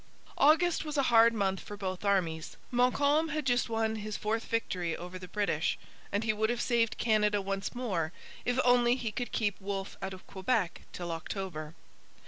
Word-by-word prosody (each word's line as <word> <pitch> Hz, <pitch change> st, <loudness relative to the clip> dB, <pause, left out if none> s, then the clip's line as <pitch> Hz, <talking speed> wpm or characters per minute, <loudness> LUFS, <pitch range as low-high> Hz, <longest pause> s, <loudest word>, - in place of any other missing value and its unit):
August 320 Hz, +4 st, +4 dB
was 300 Hz, -1 st, -4 dB
a 275 Hz, -, +3 dB
hard 230 Hz, 0 st, +8 dB
month 195 Hz, -4 st, 0 dB
for 205 Hz, -, -8 dB
both 185 Hz, -2 st, -4 dB
armies. 175 Hz, -6 st, 0 dB
Montcalm 285 Hz, +6 st, +3 dB
had 305 Hz, -1 st, -2 dB
just 245 Hz, -2 st, +2 dB
won 225 Hz, -1 st, 0 dB
his 215 Hz, 0 st, -4 dB
fourth 225 Hz, +2 st, -1 dB
victory 180 Hz, -7 st, -1 dB
over 180 Hz, +2 st, -7 dB
the 180 Hz, -, -9 dB
British; 190 Hz, -6 st, 0 dB, 0.3 s
and 205 Hz, +2 st, 0 dB
he 220 Hz, -1 st, +2 dB
would 220 Hz, +1 st, 0 dB
have 240 Hz, 0 st, 0 dB
saved 235 Hz, -2 st, +1 dB
Canada 210 Hz, -2 st, +2 dB
once 195 Hz, +3 st, -3 dB
more 185 Hz, -10 st, -1 dB, 0.3 s
if 245 Hz, +1 st, 0 dB
only 245 Hz, -1 st, +5 dB
he 235 Hz, -4 st, -3 dB
could 245 Hz, +3 st, -4 dB
keep 205 Hz, -3 st, -1 dB
Wolfe 195 Hz, 0 st, -4 dB
out 190 Hz, 0 st, -4 dB
of 185 Hz, -, -15 dB
Quebec 190 Hz, -1 st, -1 dB
till 175 Hz, -1 st, -5 dB
October. 165 Hz, -2 st, -5 dB
210 Hz, 180 wpm, -31 LUFS, 190-240 Hz, 0.3 s, hard